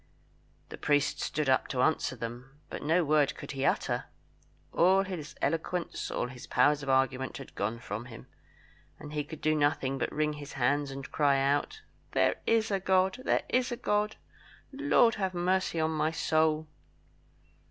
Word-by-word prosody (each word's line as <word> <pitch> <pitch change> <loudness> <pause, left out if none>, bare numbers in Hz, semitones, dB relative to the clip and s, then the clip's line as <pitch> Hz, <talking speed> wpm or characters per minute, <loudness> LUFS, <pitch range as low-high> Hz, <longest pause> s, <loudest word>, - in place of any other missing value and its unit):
The - - -9
priest 145 -1 +1
stood 155 -2 -1
up 130 -1 +3
to 125 -1 0
answer 155 -3 +1
them, 125 +4 -8
but - - -5
no 165 +4 +2
word 145 -1 +3
could - - -7
he 135 -2 -3
utter. - - 0 0.7
All 190 +3 +4
his 165 -7 -6
eloquence, 170 +2 -2
all - - -1
his 125 -1 -10
powers 150 0 +3
of 135 - -5
argument 130 0 +1
had 135 - -10
gone 110 +3 -2
from 115 -1 -6
him; 120 0 -11 0.7
and 150 - -10
he 150 -1 -1
could 160 +1 -10
do 155 - +2
nothing 145 -3 +1
but - - -1
wring 150 0 0
his 145 -1 -9
hands 140 +3 +1
and 135 0 -7
cry 140 -2 +3
out, 145 - 0 0.3
"There - - +2
is 225 -1 +2
a 195 - +1
God! 190 +4 +2
there - - +2
is 255 0 +1
a 240 - -3
God! 210 0 0 0.6
Lord 270 -4 +3
have 190 -1 -1
mercy 180 -1 0
on 160 0 +1
my 155 0 +1
soul!" 155 -1 +1
150 Hz, 175 wpm, -30 LUFS, 135-180 Hz, 0.7 s, All